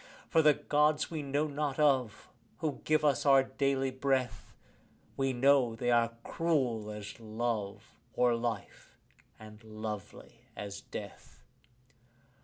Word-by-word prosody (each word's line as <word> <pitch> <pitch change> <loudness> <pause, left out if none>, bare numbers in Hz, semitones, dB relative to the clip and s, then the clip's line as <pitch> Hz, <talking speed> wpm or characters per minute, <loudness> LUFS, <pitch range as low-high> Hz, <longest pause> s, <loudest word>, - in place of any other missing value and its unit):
For 165 - +5
the 150 -2 +5
Gods 150 +1 +1
we 160 -2 -3
know 145 +2 0
not 145 -2 -2
of, 135 -7 +1 0.3
who 155 -4 -3
give 155 0 +2
us 140 -4 +2
our 135 -2 +6
daily 135 0 0
breath, 130 -5 -2 0.6
We 135 0 0
know 130 -2 +3
they 120 +1 0
are 115 -1 +2
cruel 130 -10 0
as 105 0 -8
love 110 -2 -3 0.3
or 125 -1 +3
life, 115 -3 -5 0.4
and 110 0 -13
lovely 110 -2 -8
as 100 -1 -6
death. 100 -2 -10
130 Hz, 125 wpm, -31 LUFS, 110-145 Hz, 0.6 s, our